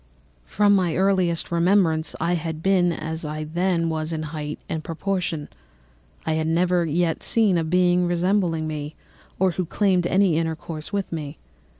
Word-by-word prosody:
From 205 0 +3
my 180 -4 +1
earliest 185 -4 +1
remembrance 170 -2 +2
I 175 - +1
had 160 -2 -3
been 185 -2 +3
as 160 0 -5
I 155 0 -4
then 170 +2 0
was 160 0 -2
in 160 -1 -3
height 150 -1 -4
and 160 -1 -4
proportion. 170 -3 -3 0.8
I 160 - 0
had 160 0 0
never 175 +1 +2
yet 165 +1 0
seen 215 -5 +3
a 165 - +1
being 180 +1 +2
resembling 175 -2 +1
me 150 -1 -5 0.4
or 190 0 +2
who 180 +2 -2
claimed 185 -2 +1
any 185 -3 +3
intercourse 160 0 -4
with 200 -2 -2
me. 150 -2 -5
170 Hz, 160 wpm, -23 LUFS, 160-185 Hz, 0.8 s, From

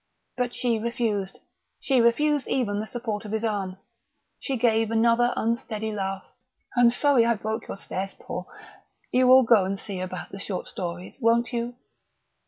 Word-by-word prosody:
But 245 -1 -2
she 235 -3 0
refused. 215 -4 -2 0.4
She 265 -3 +2
refused 290 +5 +2
even 205 -6 0
the 215 - -4
support 225 -3 -4
of 210 - -7
his 220 +1 -1
arm. 200 -4 -2 0.6
She 270 - -2
gave 225 -2 +2
another 230 +2 +3
unsteady 220 -2 -2
laugh. 195 -2 -3 0.5
"I'm 245 -1 +6
sorry 260 0 +3
I 235 0 +3
broke 220 +2 -4
your - - -6
stairs, 195 0 -5
Paul.... - - -6 0.6
You 255 0 +4
will 260 +1 +8
go 230 -4 +5
and 195 +1 -2
see 195 -1 -5
about 185 0 -6
the 195 - -7
short 195 -2 -4
stories, 175 +4 -5
won't 230 +1 +3
you?" 240 +1 -2
225 Hz, 165 wpm, -26 LUFS, 205-240 Hz, 0.6 s, will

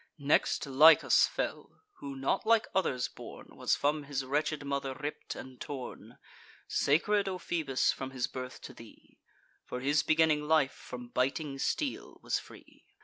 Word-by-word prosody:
Next, 145 0 +1
Lichas 150 +4 +6
fell, - - -5 0.2
who, 140 -1 -6
not 135 0 0
like 225 0 +4
others 150 -10 0
born, - - -11
Was - - 0
from 145 +1 0
his 140 -2 -3
wretched 145 +2 -1
mother 140 -1 -2
ripp'd 145 +2 -5
and 130 -1 -10
torn; 135 -4 -7 0.5
Sacred, 200 +7 +2
O 185 - -3
Phoebus, 155 -7 0
from 135 - -6
his 130 -2 -2
birth 130 -1 -7
to - - -9
thee; - - -16 0.4
For 125 - -6
his 145 +4 +2
beginning 155 -2 +2
life 155 -4 +3
from 125 -1 -9
biting 135 +3 -1
steel 280 - -2
was - - 0
free. - - -16
145 Hz, 150 wpm, -31 LUFS, 135-155 Hz, 0.5 s, Lichas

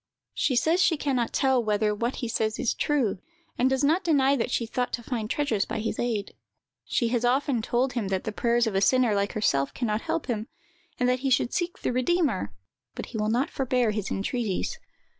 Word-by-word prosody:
"She 260 - +1
says 325 +8 +3
she 330 -3 +3
can 285 -2 -1
not 240 -2 0
tell 265 -3 +2
whether 210 0 +1
what 235 +4 -2
he 240 - -4
says 220 -1 -1
is 235 - 0
true; 260 -11 0 0.4
and 255 +1 +2
does 265 +1 0
not 325 +7 +3
deny 280 -4 +3
that 245 - -1
she 240 - 0
thought 245 +2 -2
to 235 - -3
find 225 -3 -3
treasures 235 -9 0
by - - -4
his 220 0 -3
aid. 225 -4 -2 0.5
She 235 - 0
has 240 0 0
often 255 0 +2
told 250 +4 0
him 235 -5 -2
that 190 -1 -1
the 220 - -3
prayers 235 +2 +1
of 220 - -1
a 195 - +1
sinner, 245 +2 +4
like 200 0 0
herself, 140 -10 0
can 245 - -2
not 215 0 0
help 330 - -2
him, 225 -3 -3 0.5
and 250 - +2
that 250 0 +2
he 270 +1 -1
should 250 -1 +2
seek 345 0 -2
the - - 0
Redeemer; 255 - +1 0.4
but - - -5
he - - -5
will 210 0 0
not 245 +5 +1
forbear 250 -4 +1
his 210 -2 -3
entreaties. 205 0 -2
240 Hz, 220 wpm, -26 LUFS, 215-265 Hz, 0.5 s, sinner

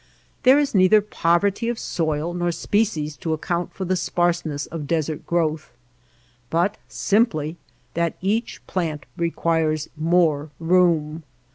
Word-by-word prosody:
There 260 +1 +6
is 290 -1 +1
neither 190 +2 +6
poverty 200 +2 +1
of 240 - -2
soil 160 -2 -2
nor 175 0 0
species 165 -6 0
to 165 -4 -2
account 170 +2 -2
for 190 - -5
the 185 +1 +1
sparseness 175 -4 0
of 155 -3 -6
desert 155 -2 -2
growth, 160 -4 -1 0.8
but 175 +5 +1
simply 175 -8 +1 0.4
that 170 -1 -1
each 215 +5 -2
plant 160 -6 -3
requires 165 -2 0
more 155 -2 +2
room. 165 -2 +2
170 Hz, 125 wpm, -23 LUFS, 155-185 Hz, 0.8 s, There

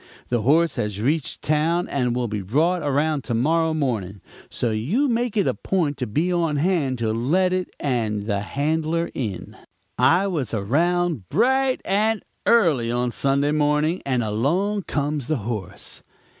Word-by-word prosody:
The 120 -2 +1
horse 160 +8 +3
has 105 -2 -2
reached 145 +6 -1
town 160 +4 +1
and 125 -3 -1
will 125 -1 -1
be 105 -1 -3
brought 160 - +1
around 145 0 0
to 120 - -1
morrow 160 +7 +2
morning; 110 -10 -2 0.3
so 120 - -1
you 160 - 0
make 235 -2 -1
it 200 - +3
a - - +1
point 165 -7 -1
to 125 - -3
be 160 - 0
on 165 -3 +1
hand 145 -4 +1
to 110 -2 -1
let 175 +11 +1
it 185 0 -1
and 110 -7 -1
the 100 -2 0
handler 155 +8 -1
in.' 105 -9 -5 0.4
"I 180 +4 +4
was 150 - -2
around 160 - 0
bright 260 - +2
and 210 +2 +1 0.2
early 160 - +3
on 120 0 0
Sunday 140 +3 +1
morning, 150 +3 +1
and 130 -3 0
along 175 - 0
comes 145 -2 -2
the 155 -1 0
horse. 110 -6 -6
145 Hz, 160 wpm, -23 LUFS, 120-175 Hz, 0.4 s, I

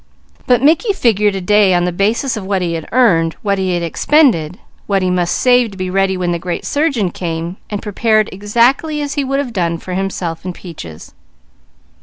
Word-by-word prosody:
But 250 0 +3
Mickey 335 - +3
figured 210 - +2
a 190 - -3
day 200 0 +3
on 175 0 +1
the 180 - -1
basis 220 +9 0
of 215 - -5
what 190 -1 -1
he 170 -1 -2
had 165 -2 -5
earned, 170 -10 +3
what 200 -2 0
he 185 -1 0
had 175 - -2
expended, 180 - +2 0.3
what 195 -2 +1
he 185 - +1
must 175 -1 0
save 245 -2 +3
to 195 - -12
be 185 -1 -3
ready 195 0 +1
when 180 -1 -1
the 170 - -2
great 175 0 -4
surgeon 275 - 0
came, 170 +1 -4
and 205 -1 -4
prepared 215 +1 +1
exactly 240 - +1
as 285 0 -4
he 285 - -1
would 275 +1 -1
have 270 -4 -3
done 170 -4 -1
for 180 +2 -7
himself 180 -3 -3
and 180 -1 -5
Peaches. 85 - -10
195 Hz, 205 wpm, -16 LUFS, 175-235 Hz, 0.3 s, But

